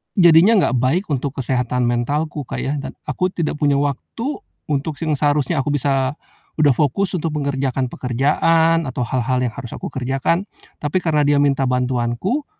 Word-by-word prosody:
jadinya 180 +3 +6
gak 130 - 0
baik 135 +11 +1
untuk 140 0 -1
kesehatan 125 -1 0
mentalku, 145 +4 -1
Kak, - - -5
ya, 145 +2 -2
dan 140 - -6
aku 185 +1 -2
tidak 160 -3 -2
punya 145 -2 +2
waktu 225 - -3 0.3
untuk 145 +2 -1
si 160 +2 -4
yang 150 - +1
seharusnya 145 +2 +1
aku 145 +2 0
bisa 135 -1 +1 0.4
udah 150 -2 +3
fokus 150 +8 +1
untuk 160 -1 -3
mengerjakan 135 -3 -1
pekerjaan, 160 +7 +2
atau 130 0 -4
hal-hal 125 +1 0
yang 125 - +1
harus 125 -4 -7
aku - - -6
kerjakan. 135 +8 -1 0.3
Tapi 150 +5 -1
karena 150 -3 +2
dia 145 0 +3
minta 135 -1 +2
bantuanku, 125 - -1
145 Hz, 165 wpm, -20 LUFS, 130-160 Hz, 0.4 s, jadinya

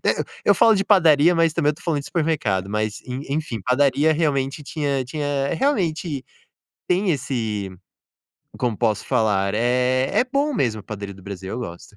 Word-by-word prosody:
eh, - - +2 0.2
eu - - +5
falo 225 - +5
de 195 -1 0
padaria, 165 -4 +5
mas 165 -1 +3
também 145 - +1
eu - - -2
estou 150 - -16
falando 155 -4 0
de 140 - -10
supermercado, 120 - -1
mas, 105 0 -2
en 130 +2 -5
enfim, 140 -6 -3
padaria 140 +5 +3
realmente 145 -2 -1
tinha 140 -2 -2
tinha 140 0 -2
realmente 170 - -1 0.6
tem 185 +2 +2
esse, 110 - -2 0.9
como 120 -4 -1
posso 110 -3 0
falar, 100 -3 +1
eh, 125 +3 +1
é - - +4
bom 280 +3 -1
mesmo 115 - -1
padaria 100 -2 -7
do 95 - -15
Brasil, 95 -1 -7
eu - - -4
gosto. 90 -3 -8
135 Hz, 170 wpm, -22 LUFS, 110-160 Hz, 0.9 s, eu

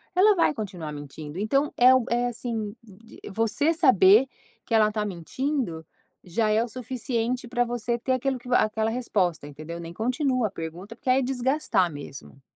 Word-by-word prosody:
ela 410 +4 +6
vai 335 - +3
continuar 185 - -6
mentindo, 145 +2 -8
então 275 +8 +1
é 255 +1 +7
o 260 - +3
é 240 +1 +1
assim 225 -3 -4
de 220 +1 -16
você 225 - +1
saber 250 - +6 0.4
que 230 - -5
ela 215 -1 +4
tá 210 -1 -2
mentindo, 190 - -3 0.4
já 215 +5 0
é 215 +2 +3
o 240 - -4
suficiente 245 0 -3
pra 245 0 +1
você 240 0 -2
ter 260 +2 0
aquilo 260 0 -1
que 245 +1 -12
aquela 220 -2 +2
resposta 200 - -1
entendeu? 155 +4 -8
Nem 170 0 -8
continua 250 - 0
a - - -10
pergunta, 175 +5 -7
porque 260 +2 -5
aí 260 - +4
é - - +1
desgastar 255 - +1
mesmo. 140 -1 -10
225 Hz, 175 wpm, -25 LUFS, 185-255 Hz, 0.4 s, é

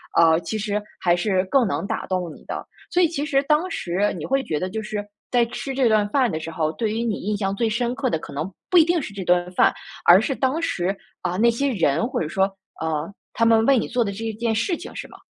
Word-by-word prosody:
呃， 165 -1 +5
其 215 +3 -3
实 210 0 -1 0.2
还 175 -1 +3
是 185 0 +1
更 245 +4 +3
能 195 - -2
打 - - -3
动 180 -3 -2
你 - - -17
的。 - - -5 0.3
所 360 - +3
以 345 - +5
其 300 -3 -3
实 275 -3 +2
当 305 +5 +2
时 190 +4 0
你 - - -6
会 270 0 +1
觉 150 -8 -2
得 185 - -2
就 220 +3 -4
是， 210 -1 -4 0.3
在 245 -1 +4
吃 270 +3 -5
这 260 -2 +3
顿 215 -2 +3
饭 260 -2 +2
的 155 - -2
时 165 +1 -6
候， 155 -1 -1
对 220 +1 -1
于 225 - -1
你 225 -3 -2
印 210 +2 -1
象 195 -1 -1
最 230 +2 +1
深 240 +3 -1
刻 270 0 -1
的 160 - -1
可 - - -10
能 160 +6 -4 0.2
不 360 - +4
一 325 - +9
定 345 -1 +1
是 210 - -7
这 200 -1 -5
顿 180 0 +2
饭， - - +4 0.3
而 175 +2 +9
是 265 +5 -1
当 270 +6 0
时， 190 - -1 0.3
啊， 180 0 -2
那 235 +2 +5
些 275 +5 0
人， 165 -1 +1
或 255 -1 -2
者 155 - -1
说， 190 +4 +1 0.4
呃， 160 +1 -2 0.2
他 230 - +2
们 225 0 +5
为 275 -2 +5
你 - - 0
做 245 -1 +1
的 200 - -2
这 220 +3 -6
一 225 - -2
件 230 +1 -1
事 340 - 0
情 345 - -9
是 - - -6
吗？ - - -14
215 Hz, 290 characters per minute, -23 LUFS, 180-255 Hz, 0.4 s, 一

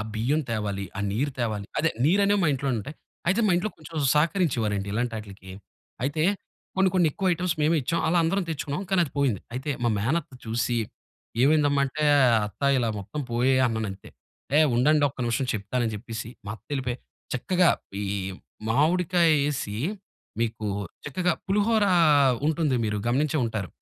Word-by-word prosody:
బియ్యం 130 +8 +1
తేవాలి, 105 -3 -2
ఆ - - -1
నీరు 135 +7 -1
తేవాలి. 110 -4 -2
అదే 165 - +2
నీరనేవి 200 +4 +3
మా 160 - +3
ఇంట్లో 135 +1 -2
ఉంటయి. 145 +9 -7 0.3
అయితే 200 +5 +3
మా - - +3
ఇంట్లో 205 +4 -1
కొంచెం 160 +1 -11 0.2
సహకరించేవారండి 125 - +1
ఇలాంటాటిలకి. 105 -5 -4 0.5
అయితే 145 +3 0 0.5
కొన్ని 190 0 +4
కొన్నెక్కువ 180 +2 +2
ఐటెమ్స్ 175 0 -1
మేము 160 +2 +3
ఇచ్చాం. 165 +6 -1
అలా 175 +2 +3
అందరం 190 +3 +1
తెచ్చుకున్నాం. 150 +2 -3
కానీ 190 -2 +3
అది 145 - -10
పోయింది. 130 -9 +1
అయితే 135 +4 -3
మా 120 - +3
మేనత్త 140 +8 -1
చూసి 115 +1 0 0.7
ఏమైందమ్మా 145 -1 +3
అంటే, 150 +3 -2 0.4
అత్త 105 - -13 0.2
ఇలా 120 -2 +1
మొత్తం 150 +10 -6
పోయాయన్నానంతే. 120 -5 0 0.5
"ఏహ్! 155 -1 +5
ఉండండొక్క 145 +2 +3
నిమిషం 120 +3 0
చెప్తానని" 110 +3 -1
జెప్పేసి 115 +1 -6 0.2
మా - - -4
అత్తెళ్ళిపోయి 130 +2 -4 0.4
చక్కగా 180 +7 +2 0.3
ఈ - - -2 0.6
మామిడికాయేసి 150 - +2 0.6
మీకు 110 -2 -2 0.4
చక్కగా 175 +5 0
పులిహోర 210 +2 +2 0.6
ఉంటుంది 155 -3 +1
మీరు 105 0 -1
గమనించే 150 +5 +1
ఉంటారు. 110 -5 -3
140 Hz, 140 wpm, -26 LUFS, 115-165 Hz, 0.7 s, ఏహ్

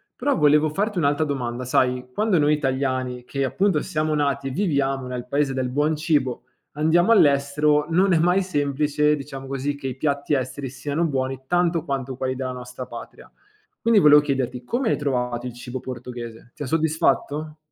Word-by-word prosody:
Però 285 -7 0
volevo 150 0 +4
farti 200 +3 -1
un'altra 145 +1 +2
domanda: 125 -3 -3
sai, 125 0 +1
quando 210 -4 +2
noi 150 0 +3
italiani, 130 -3 -1
che 135 -1 -2
appunto 185 +3 +1
siamo 155 0 -1
nati 140 -2 0
e - - -3
viviamo 135 -6 0
nel 125 -1 -5
paese 140 0 0
del 130 -1 -1
buon 150 +4 +1
cibo, 145 -5 0 0.3
andiamo 170 +8 +3
all'estero, 150 +2 +2
non 185 +3 +3
è 160 - +4
mai 180 +3 +3
semplice, 150 -2 +1
diciamo 135 -1 -8
così, 135 +1 -2
che 135 -2 -6
i 130 0 -5
piatti 140 0 0
esteri 130 +1 -3
siano 145 +5 -3
buoni 130 -3 -2
tanto 175 -2 +1
quanto 135 -4 -3
quelli 130 0 -2
della 130 0 -3
nostra 125 0 -8
patria. - - -11 0.5
Quindi, 230 -3 +4
volevo 150 -3 +7
chiederti: 130 -3 -2
come 240 - -1
hai - - +1
trovato 125 -3 -2
il 120 - -6
cibo 125 +1 -7
portoghese? 120 -2 -8
Ti 150 -2 -7
ha - - -4
soddisfatto? 155 0 0
140 Hz, 175 wpm, -23 LUFS, 130-155 Hz, 0.5 s, volevo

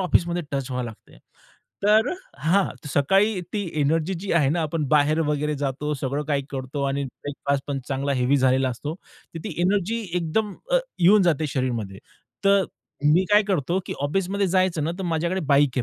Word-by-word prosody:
ऑफिसमध्ये 175 -1 +1
टच 135 -1 -2
व्हायला 125 -1 -2
लागते. 110 - -18 0.6
तर 215 +4 +4 0.3
हां, 170 +8 +3 0.2
सकाळी 195 +9 +2
ती 205 -4 -2
एनर्जी 160 +5 +1
जी 200 - -3
आहे 150 -5 +3
ना, 165 +5 +1
आपण 155 0 -1
बाहेर 150 +2 +3
वगैरे 150 0 0
जातो 145 +1 -2
सगळं 140 +1 -2
काही 145 -1 0
करतो 135 +1 -4
आणि 140 +1 -1
ब्रेकफास्ट 140 +1 -3
पण 140 -1 -2
चांगला 140 +1 -1
हेवी 130 +2 +2
झालेला 130 0 +3
असतो. 145 +5 -4
तर 165 -2 -14
ती - - -4
एनर्जी 205 +4 +1
एकदम 185 +5 0 0.2
अ, - - +5 0.2
येऊन 195 +4 +6
जाते 160 -3 +2
शरीरमध्ये, 115 -7 -2 0.5
तर 195 -1 +5 0.5
मी 180 +4 +4
काय 210 +1 +7
करतो 185 -4 0
की - - -3
ऑफिसमध्ये 195 +5 0
जायचं 185 -4 +1
ना, 160 - 0
तर - - -3
माझ्याकडे 170 +4 0
बाईक 140 -2 +3
आहे - - +2
155 Hz, 175 wpm, -24 LUFS, 140-185 Hz, 0.6 s, काय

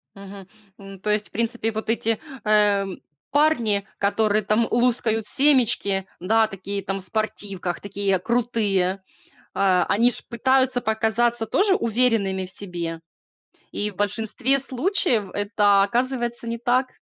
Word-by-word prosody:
Мгм, 195 -1 -11 0.3
м, 195 -1 -11
то 210 +2 -4
есть, 210 0 0
в - - -39
принципе, 230 0 -2
вот 220 0 -5
эти, 225 -1 0 0.3
э, 210 -2 +3 0.5
парни, 240 -9 +2
которые 210 +1 +1
там 215 +3 +1
лузгают 235 -2 +1
семечки, 245 -9 +2
да, 220 +5 +2
такие 200 0 -5
там 195 +1 -3
в - - -5
спортивках, 195 -3 -3
такие 200 -1 -1
крутые, 205 -4 0 0.5
э, 185 -2 +2
они 235 +4 +3
ж - - +2
пытаются 260 +1 +1
показаться 225 +1 +1
тоже 390 - +2
уверенными 220 - +1
в 185 - -8
себе. 170 -4 -5 0.7
И 210 0 -2
в 195 - -20
большинстве 225 +6 0
случаев 255 - +1
это 205 -1 +2
оказывается 240 +2 -1
не 230 0 -3
так. 250 +2 +1
215 Hz, 135 wpm, -23 LUFS, 200-240 Hz, 0.7 s, э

